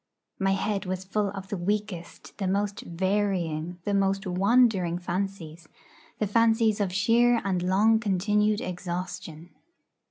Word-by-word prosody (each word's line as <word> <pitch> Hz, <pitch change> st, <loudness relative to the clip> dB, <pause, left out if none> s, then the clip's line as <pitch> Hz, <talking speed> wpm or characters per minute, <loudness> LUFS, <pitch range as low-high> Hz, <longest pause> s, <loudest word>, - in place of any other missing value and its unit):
My 195 Hz, 0 st, +2 dB
head 195 Hz, 0 st, -2 dB
was 185 Hz, 0 st, -3 dB
full 200 Hz, +1 st, -1 dB
of 195 Hz, -1 st, -8 dB
the 205 Hz, -, -3 dB
weakest, 195 Hz, -1 st, -4 dB
the 195 Hz, -, -1 dB
most 200 Hz, +1 st, -1 dB
varying, 180 Hz, -3 st, -1 dB
the 205 Hz, -, 0 dB
most 195 Hz, 0 st, +1 dB
wandering 190 Hz, -1 st, +3 dB
fancies 175 Hz, -3 st, -4 dB, 0.5 s
the 215 Hz, -, 0 dB
fancies 225 Hz, 0 st, +3 dB
of 195 Hz, -3 st, 0 dB
sheer 230 Hz, +5 st, +3 dB
and 185 Hz, -2 st, 0 dB
long 205 Hz, +5 st, +3 dB
continued 210 Hz, +1 st, +1 dB
exhaustion. 180 Hz, -2 st, -6 dB
195 Hz, 130 wpm, -27 LUFS, 180-210 Hz, 0.5 s, wandering